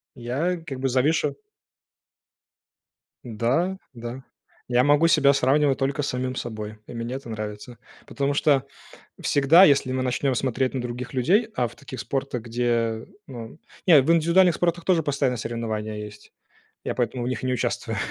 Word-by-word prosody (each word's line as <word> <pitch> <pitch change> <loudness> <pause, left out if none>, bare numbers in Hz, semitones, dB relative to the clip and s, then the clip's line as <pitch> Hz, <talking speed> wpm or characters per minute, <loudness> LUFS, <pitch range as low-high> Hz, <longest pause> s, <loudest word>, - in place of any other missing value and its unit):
Я 135 +9 -2
как 135 -4 -6
бы 135 0 0
завишу 135 +6 +1 1.9
Да, 130 - 0 0.2
да. 120 +2 -7 0.5
Я 125 +1 +4
могу 145 +4 +4
себя 140 -4 +5
сравнивать 140 +1 +2
только 140 +2 -1
с - - -2
самим 130 0 -3
собой, 110 -3 -6
и - - -10
мне 115 +2 -4
это 135 -3 -8
нравится. 110 +2 -7 0.3
Потому 140 0 -1
что 140 -2 +3 0.6
всегда, 145 +6 +5
если 140 -5 +4
мы 130 0 -1
начнем 130 +2 0
смотреть 130 +1 -1
на 130 - -2
других 125 +2 -6
людей, 195 - +2
а 125 -1 +1
в - - -14
таких 130 - -9
спортах, 135 -3 -3
где, 115 -1 -1 0.2
ну, 120 +1 -9 0.3
не 160 -7 +7
в 150 - +2
индивидуальных 170 +1 +4
спортах 175 -1 0
тоже 175 -4 +2
постоянно 140 -4 0
соревнования 110 -1 -4
есть. 105 0 -12 0.5
Я - - -3
поэтому 120 0 -1
в - - -2
них 130 - -4
и - - -2
не 130 - +1
участвую. 125 - -2
130 Hz, 160 wpm, -24 LUFS, 120-145 Hz, 1.9 s, не